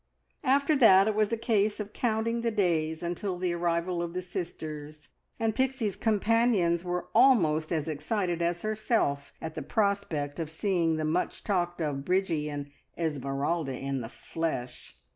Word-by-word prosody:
After 280 +3 +3
that 195 -6 +7
it 215 - +2
was 215 +1 +1
a 230 - +1
case 215 -3 +1
of 210 0 -5
counting 230 0 0
the 235 - +1
days 165 -6 0
until 175 +2 -2
the 180 -1 -1
arrival 170 +1 0
of 170 0 -4
the 185 - -2
sisters, 155 -5 -6 0.3
and 225 -1 +1
Pixie's 260 -5 0
companions 215 -5 +2
were 180 -1 -2
almost 175 - +4
as 160 -2 -1
excited 170 +3 -1
as 170 0 0
herself 215 - 0
at 160 -1 -4
the - - -5
prospect 200 -9 -1
of 160 -2 -3
seeing 165 -1 +1
the 155 - -1
much 165 +4 -1
talked 175 -4 -1
of 140 -2 -2
Bridgie 170 -4 0
and 145 -1 -5 0.3
Esmeralda 145 -1 -1
in 135 -1 -3
the 115 - -6
flesh. 130 - -5
175 Hz, 160 wpm, -29 LUFS, 155-215 Hz, 0.3 s, that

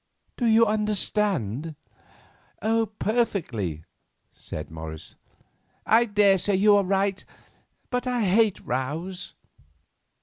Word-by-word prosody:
Do 240 - 0
you 225 +1 +5
understand?" 205 - 0 1.2
"Perfectly," 135 - -1 0.5
said 75 - -8
Morris. 80 -1 -8 0.7
"I 230 +2 +4
daresay 205 -2 +3
you 205 +2 +5
are 200 - +3
right, 195 +1 0 0.7
but 250 0 -1
I 245 -2 0
hate 205 +2 +3
rows." 160 +9 -4
195 Hz, 90 wpm, -25 LUFS, 145-215 Hz, 1.2 s, you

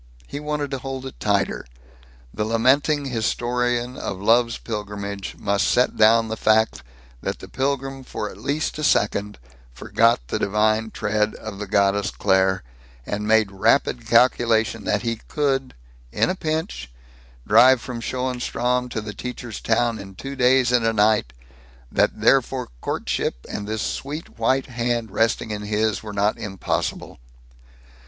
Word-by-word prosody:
He 145 - -6
wanted 150 -1 -3
to 135 - -2
hold 135 0 -6
it 130 - -9
tighter. 100 -2 0 0.7
The 105 - -2
lamenting 135 +6 +2
historian 120 0 -1
of 95 - -4
love's 115 +3 +3
pilgrimage 100 -2 -5
must 100 -1 +1
set 125 - +2
down 115 +1 +5
the 110 - -3
fact 110 - +2 0.4
that - - -3
the - - -11
pilgrim 135 0 -2
for 105 - -5
at 95 - -10
least 145 +6 -2
a - - -3
second 105 -5 +1 0.3
forgot 115 - +2
the - - -2
divine 110 +2 +1
tread 105 0 -1
of 100 - -8
the 105 - -5
goddess 100 +1 +2
Claire, 95 -2 +2 0.4
and 105 +1 -3
made 110 -2 +3
rapid 115 +4 +1
calculation 115 -2 +3
that 105 +2 0
he 115 -1 -1
could, 135 -3 -1 0.4
in - - +1
a - - -3
pinch, 155 - -3 0.6
drive 130 0 +7
from 120 -1 -6
Schoenstrom 125 0 -1
to 110 - -3
the 105 0 -7
teacher's 120 0 -6
town 115 0 +1
in 95 -1 -10
two 135 +7 -7
days 125 -1 +4
and 120 -2 +3
a 115 0 +2
night; 105 - +3 0.6
that - - +1
therefore - - +2
courtship, - - -2
and 105 - -5
this 110 -1 -2
sweet 145 -2 -5
white 130 +4 +2
hand 120 -3 -2
resting 115 +1 0
in 105 -1 -4
his, 105 0 0
were 110 - -7
not 100 +1 0
impossible. 95 - -3
115 Hz, 150 wpm, -23 LUFS, 105-125 Hz, 0.7 s, drive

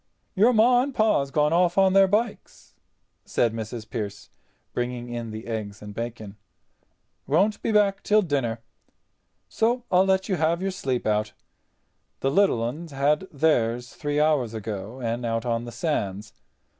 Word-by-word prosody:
"Your 220 +6 +4
Ma 245 +2 +5
and 270 0 -3
Pa's 215 -11 +2
gone 150 +2 +2
off 175 +1 +2
on 190 -1 +5
their 195 0 +6
bikes," 215 +3 -3 0.5
said 115 -2 0
Mrs. 110 0 -6
Pearce, 100 -5 -6 0.4
bringing 120 0 -3
in 120 -1 -5
the 110 +1 -7
eggs 105 -3 -5
and 105 -1 -9
bacon, 110 -3 -6 0.9
"won't 195 +9 +2
be - - -1
back 200 -2 +3
till 215 0 +3
dinner. 130 -8 -1 0.9
So 235 - 0
I 180 - +5
let 190 0 +2
you 190 -4 0
have 160 +2 +1
your 195 +1 -2
sleep 135 -10 -2
out. 105 0 0 0.9
The 135 - +1
little 190 - +3
'uns 150 +8 -5
had 145 +6 +1
theirs 125 -5 +1
three 145 -1 -2
hours 145 -7 +2
ago 110 +2 -6
and 120 +1 -2
out 115 0 -2
on 115 0 -1
the 120 - -7
sands. 110 - -3
135 Hz, 155 wpm, -25 LUFS, 115-190 Hz, 0.9 s, their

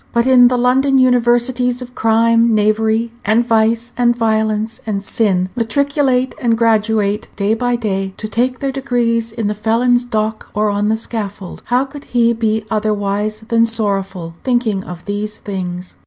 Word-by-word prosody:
But 235 0 +2
in 255 -2 +6
the 250 0 +1
London 265 +3 +2
universities 245 0 +2
of 250 -1 -9
crime, 230 0 +3
knavery, 220 +2 +1
and 220 +3 +2
vice, 230 +1 +1
and 240 -1 +2
violence, 220 -1 -1
and 200 -2 -2
sin 190 -4 0
matriculate 260 +2 0
and 230 -3 +2
graduate 220 -2 +1
day 200 +1 0
by 245 +1 0
day, 195 -4 -3
to 215 - -5
take 250 +4 0
their 275 0 -2
degrees 240 -4 -1
in 225 -1 -4
the 210 - 0
felon's 235 +3 +1
dock 220 -2 -3
or 210 0 +1
on 205 +1 0
the 220 - +1
scaffold. 205 -5 -6
How 250 +2 +2
could 280 +1 -11
he 235 -1 +2
be 220 -1 -1
otherwise 210 0 -1
than 230 0 +3
sorrowful, 195 -6 -2
thinking 240 -6 0
of 175 -1 -9
these 205 +1 -4
things? 180 -2 -6
225 Hz, 160 wpm, -17 LUFS, 210-245 Hz, -, in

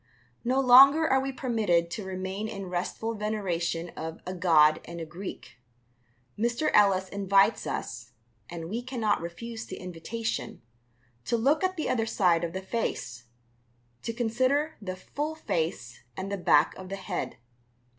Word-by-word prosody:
No 255 +3 +2
longer 275 +5 +8
are 265 - +4
we 270 0 -2
permitted 215 -10 +1
to 210 - -4
remain 190 +2 -4
in 195 -4 -6
restful 185 +5 -2
veneration 180 -6 -2
of 160 0 -7
"a 185 - -4
god 160 -4 +4
and 170 0 -8
a 165 - -4
Greek." 170 -6 -9 0.8
Mr. 235 +7 0
Ellis 195 -2 +4
invites 200 +1 +3
us 120 +1 -5 0.4
and 165 -1 -6
we 225 +7 -3
cannot 240 -6 0
refuse 220 +7 -6
the 185 - -6
invitation 185 - -5 0.6
to 235 - +1
look 280 +9 +2
at 370 0 0
the 310 - -1
other 225 -2 0
side 175 -6 +2
of 165 -1 -3
the 190 0 -4
face, 125 - -3 0.8
to 230 - -3
consider 255 +6 0
the 185 -2 -4
full 295 +11 -4
face 160 - -3 0.2
and 195 +1 -4
the - - 0
back - - +4
of 185 -1 -9
the 195 - -3
head. 190 -2 -4
195 Hz, 155 wpm, -28 LUFS, 175-235 Hz, 0.8 s, longer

